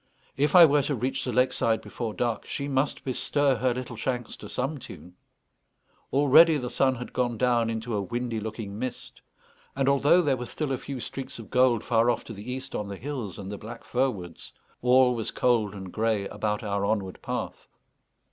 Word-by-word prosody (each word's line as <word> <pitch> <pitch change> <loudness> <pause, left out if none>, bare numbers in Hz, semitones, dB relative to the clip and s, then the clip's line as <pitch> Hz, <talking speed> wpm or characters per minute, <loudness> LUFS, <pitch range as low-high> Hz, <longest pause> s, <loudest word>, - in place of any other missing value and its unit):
If 145 +3 +1
I 175 -2 +11
were 145 -1 +4
to 140 +1 -1
reach 130 +3 -2
the 125 - -2
lake 125 +1 +2
side 110 -1 +1
before 115 -3 -5
dark 120 -3 -2
she 140 - -3
must 135 +1 0
bestir 135 +1 +1
her 125 +3 +1
little 125 0 -5
shanks 120 +1 -3
to - - -10
some 135 +4 -2
tune. 90 -6 -12 1.0
Already 145 +4 +6
the 125 -3 -4
sun 130 -1 +2
had 125 0 -8
gone 120 -2 0
down 120 -1 +2
into 115 +1 -3
a 105 - 0
windy 120 +3 -3
looking 110 -1 -6
mist; 130 0 -6 0.5
and 135 -1 0
although 145 +6 +4
there 140 -4 +2
were 125 0 -5
still 150 +1 -3
a 130 - -1
few 135 -2 -6
streaks 135 +2 -6
of 115 -3 -11
gold 125 -3 +3
far 115 0 +3
off 120 - 0
to 115 - -9
the 105 +4 -7
east 130 +1 -5
on 105 - -3
the 100 -1 -6
hills 125 -7 -5
and 100 -1 -7
the 105 - -6
black 115 +2 -9
fir 130 +2 +1
woods, 90 -8 -8 0.3
all 125 0 +5
was 115 -3 -2
cold 110 -5 +1
and 95 -2 -8
grey 110 -3 0
about 105 0 -2
our 100 -1 -1
onward 100 -3 -1
path. - - -5
125 Hz, 205 wpm, -27 LUFS, 110-135 Hz, 1.0 s, I